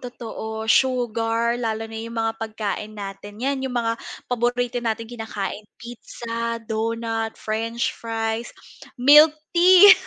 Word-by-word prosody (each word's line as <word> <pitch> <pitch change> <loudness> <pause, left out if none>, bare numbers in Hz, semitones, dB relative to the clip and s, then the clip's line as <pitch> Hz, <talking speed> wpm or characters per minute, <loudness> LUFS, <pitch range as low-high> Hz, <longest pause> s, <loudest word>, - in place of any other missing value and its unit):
totoo 220 -3 -6
sugar 235 -1 +2
lalo 225 -1 -2
na 225 0 -7
yung 230 +1 -7
mga 225 0 +1
pagkain 215 -1 -4
natin 205 0 -8
yan 275 0 0
yung 260 -2 -3
mga 230 -1 +1 0.3
paborito 245 0 0
nating 230 -1 -2 0.2
kinakain 210 -1 -5
pizza, 230 0 -5
donut, 225 0 -2
french 230 +4 -2
fries, 225 0 -3 0.5
milk 295 +5 +8 0.2
tea. 370 +3 +9
230 Hz, 120 wpm, -23 LUFS, 220-245 Hz, 0.5 s, tea